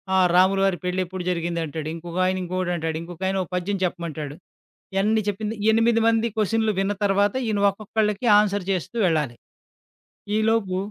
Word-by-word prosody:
ఆహ్, 185 -1 +5
రాములు 190 +2 +4
వారి 190 -2 +1
పెళ్ళెప్పుడు 185 0 -2
జరిగిందంటాడు, 165 -3 -2
ఇంకొకాయన 180 +3 -1
ఇంకొకటంటాడు, 175 -3 -2
ఇంకొకాయన 180 +3 -3
ఒక - - -13
పధ్యం 190 +3 -1
చెప్పమంటాడు. 160 -5 -5 0.6
యన్ని 215 +3 +2
చెప్పింది 210 +2 -2 0.2
ఎనిమిది 230 +1 +3
మంది 230 0 +3
క్వెషన్లు 220 +1 +1
విన్న 195 +1 +1
తర్వాత 200 +1 +2
ఈయన 210 -2 0
ఒక్కొక్కళ్ళకి 210 +2 -2
ఆన్సర్ 205 -2 0
చేస్తూ 185 +4 -3
వెళ్ళాలి. 150 -8 0 1.0
ఈలోపు 220 -4 +1
190 Hz, 130 wpm, -23 LUFS, 175-210 Hz, 1.0 s, ఆహ్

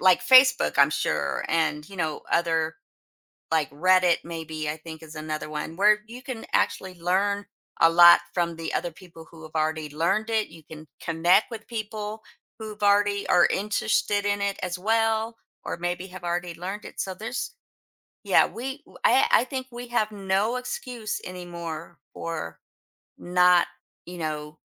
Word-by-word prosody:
like 185 -1 +5
Facebook, 260 0 +6
I'm - - +6
sure, - - -1
and, 160 -2 0
you 195 - -11
know, 160 -3 -2
other 165 -2 +1 0.7
like 155 -4 +1
Reddit, 180 +3 +4
maybe, 160 -2 -5
I 150 - -2
think 160 0 -10
is 160 0 -11
another 155 0 -4
one, 155 +2 -5
where 210 +2 +5
you 245 +3 -10
can 255 -4 -6
actually 185 -1 0
learn 200 +4 0 0.3
a 165 - +7
lot 175 +1 +8
from 170 -2 -1
the 165 - -5
other 175 - -1
people 165 0 -14
who 160 -1 -14
have 155 - -11
already 155 -1 -1
learned 190 +8 0
it. 220 -1 +1
You 160 0 -14
can 155 0 -11
connect 175 +6 +2
with 225 -1 -8
people 215 -1 -5 0.4
who've 215 -1 -8
already 205 0 +3
are 175 -1 +6
interested 205 0 0
in 205 0 0
it 200 -1 -1
as 180 -1 -3
well, 225 +2 +1 0.3
or - - -3
maybe 175 +1 -3
have 185 0 -10
already 175 0 -2
learned 190 +4 -5
it. - - -8
So 190 -1 -3
there's 225 +6 -4 0.7
yeah, - - +5
we 265 +5 -6 0.2
I - - +5
I - - +6
think 260 0 -5
we 240 0 -8
have 215 -3 0
no 200 +3 0
excuse 250 - -5
anymore 170 -2 -7 0.2
for 85 - -5 0.6
not, 180 0 +4 0.4
you 180 0 -9
know, 155 -1 -5
180 Hz, 165 wpm, -25 LUFS, 165-210 Hz, 0.7 s, lot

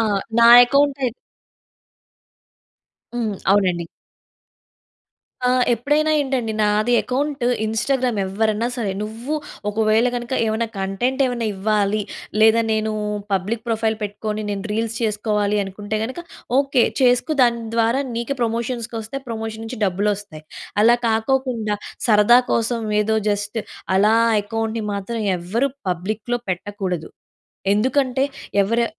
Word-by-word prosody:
ఆ! - - +3 0.4
నా 235 - +7 0.2
అకౌంట్ 280 +2 +2
అయి 240 - 0 2.0
హ్మ్? 230 -4 -2 0.2
అవునండి. 185 -4 +2 1.6
ఆ! - - +4 0.2
ఎప్పుడైనా 295 +6 +1
ఏంటి 275 -2 -1
అండి, 225 -2 -3
నాది 210 +3 +2
అకౌంట్ 275 +1 -2 0.2
ఇన్‌స్టాగ్రామ్ 245 +1 0
ఎవ్వరైనా 215 +3 0
సరే 225 -5 -1
నువ్వు 225 +7 -4 0.4
ఒకవేళ 220 +2 +2
గనుక 240 +1 -4
ఏమైనా 220 +1 0
కంటెంట్ 195 +8 -1
ఏవన్నా 240 -2 -2
ఇవ్వాలి, 210 +1 +1 0.4
లేదా 220 +1 +6
నేను 220 0 0 0.4
పబ్లిక్ 205 +4 -1
ప్రొఫైల్ 220 -1 0
పెట్టుకొని, 210 +1 -3
నేను 200 -1 -3
రీల్స్ 225 +1 -2
చేసుకోవాలి 210 -1 0
అనుకుంటే 205 +2 -4
గనుక 260 +8 -5 0.4
ఓకే. 275 -3 +3 0.2
చేసుకో. 250 +4 +3
దాని 235 -1 +3
ద్వారా 230 +3 +2
నీకే 235 +4 -2
ప్రమోషన్స్‌కి 235 0 -2
వస్తాయి, 240 +5 -6
ప్రమోషన్ 225 -1 -5
నుంచి 225 +2 -7
డబ్బులు 195 +2 0
వస్తాయి. 175 -7 -11 0.4
అలా 235 +2 +6
కాకోకుండా 225 -1 0 0.3
సరదా 215 +2 +6
కోసం 230 0 0 0.2
ఏదో 220 +1 +1
జస్ట్ 205 +2 -2 0.4
అలా 210 +3 +4 0.3
అకౌంట్‌ని 225 +1 -3
మాత్రం 200 +4 -4 0.2
ఎవరు 220 +11 0 0.2
పబ్లిక్‌లో 215 +7 -2
పెట్టకూడదు. 185 -3 -3 0.7
ఎందుకంటే 260 +3 +1 0.4
ఎవరు 230 +4 +1
225 Hz, 120 wpm, -21 LUFS, 210-240 Hz, 2.0 s, నా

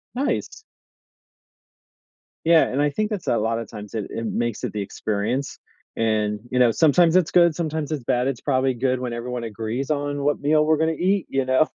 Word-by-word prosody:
Nice. 280 - -2 1.8
Yeah, 165 -1 +6
and 135 +3 -1
I 145 - +3
think 215 +7 -2
that's 210 -4 -5
a 120 - +2
lotta 115 +1 -1
times 105 -2 -10
it 110 -3 -3
it 115 - -4
makes 120 0 -2
it - - -3
the 105 - -2
experience 110 +7 -3 0.4
and, 105 -2 0
you 125 - +1
know, 125 -1 +6
sometimes 165 +6 +4
it's 185 -3 +3
good, 170 -2 +5
sometimes 160 -2 -3
it's 145 -5 -3
bad. 125 +2 +1
It's 135 -3 -2
probably 130 -2 +1
good 130 +1 0
when 125 -2 -4
everyone 120 +1 -4
agrees 115 +4 -4
on 145 -1 -1
what 145 0 +1
meal 150 +2 +3
we're 155 0 +3
gonna 160 +1 +1
eat, 185 +4 0
you 135 -1 0
know? 130 +4 +3
130 Hz, 195 wpm, -23 LUFS, 115-155 Hz, 1.8 s, Yeah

